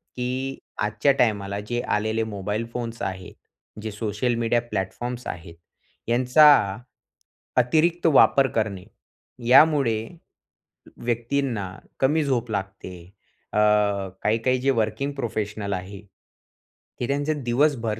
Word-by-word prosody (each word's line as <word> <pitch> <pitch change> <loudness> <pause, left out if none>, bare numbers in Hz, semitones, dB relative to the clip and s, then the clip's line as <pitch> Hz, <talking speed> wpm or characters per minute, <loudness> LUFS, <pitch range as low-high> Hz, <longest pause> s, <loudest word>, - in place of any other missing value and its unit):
की 130 +2 -3 0.2
आजच्या 110 +6 +2
टायमाला 100 -4 +1
जे 120 +1 -1 0.2
आलेले 110 +1 -1
मोबाईल 105 +1 -3
फोन्स 115 -2 -5
आहेत. 95 -1 -5 0.5
जे 110 0 -5
सोशल 105 +3 -1
मीडिया 115 +1 +1
प्लॅटफॉर्म्स 120 +3 -4
आहेत. 85 0 -7 0.5
यांचा 125 +6 +5 1.1
अतिरिक्त 160 +8 +2
वापर 135 0 +6
करणे. 100 -4 -1 0.6
यामुळे 135 -3 +5 1.0
व्यक्तींना 120 -3 -2 0.3
कमी 150 +4 +2
झोप 120 -5 -1
लागते. 95 -2 -5 0.6
अ, - - -1 0.7
काही-काही 115 +4 +1
जे 135 - +1
वर्किंग 110 +6 -2
प्रोफेशनल 105 -5 -3
आहे 95 +1 -6 1.0
हे 120 - -1
त्यांचे 145 +3 0
दिवसभर, 120 -4 0
115 Hz, 105 wpm, -24 LUFS, 105-130 Hz, 1.1 s, वापर